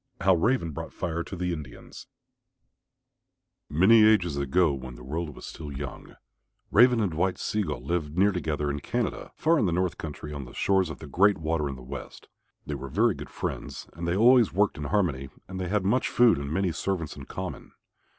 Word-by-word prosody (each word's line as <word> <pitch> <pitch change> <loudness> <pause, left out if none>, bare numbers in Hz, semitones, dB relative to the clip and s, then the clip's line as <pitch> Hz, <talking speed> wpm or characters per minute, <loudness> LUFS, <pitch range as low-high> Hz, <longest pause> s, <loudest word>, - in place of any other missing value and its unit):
HOW 95 +2 +5
RAVEN 85 -1 +1
BROUGHT 70 - -7
FIRE 85 -1 -3
TO 95 - -7
THE 90 -1 -2
INDIANS 75 -7 -9 1.6
Many 100 +9 +6
ages 100 -8 +4
ago 70 +3 +2
when 65 -2 -7
the - - -12
world 75 +2 -4
was - - -10
still 75 -3 -8
young, 70 +1 -7 0.6
Raven 120 +2 +6
and 100 -6 0
White 90 +3 0
Sea 105 - -1
gull 65 -10 -4
lived 80 0 -2
near 100 +2 +5
together 75 -5 -2
in 70 - -3
Canada, - - -3
far 165 0 +3
in 105 - +2
the - - 0
north 90 -1 -1
country 75 -1 -6
on 70 -2 -6
the - - -13
shores 95 -3 +2
of 80 - -6
the - - -10
Great 100 +7 +3
Water 80 -2 -1
in 70 - -5
the 65 - -11
west. 65 - -9 0.4
They 75 - -4
were 70 -1 -6
very - - +3
good - - -9
friends - - -5
and 85 +2 -5
they 85 - +1
always 120 +1 +6
worked 100 -2 +1
in 75 - -4
harmony 70 -5 0 0.2
and 95 0 -6
they 90 - -2
had 100 +1 0
much 120 +6 +2
food 120 -9 +4
and 70 0 -5
many 95 +2 +1
servants 85 -2 -3
in 70 - -9
common. - - -7
85 Hz, 205 wpm, -27 LUFS, 75-95 Hz, 1.6 s, Many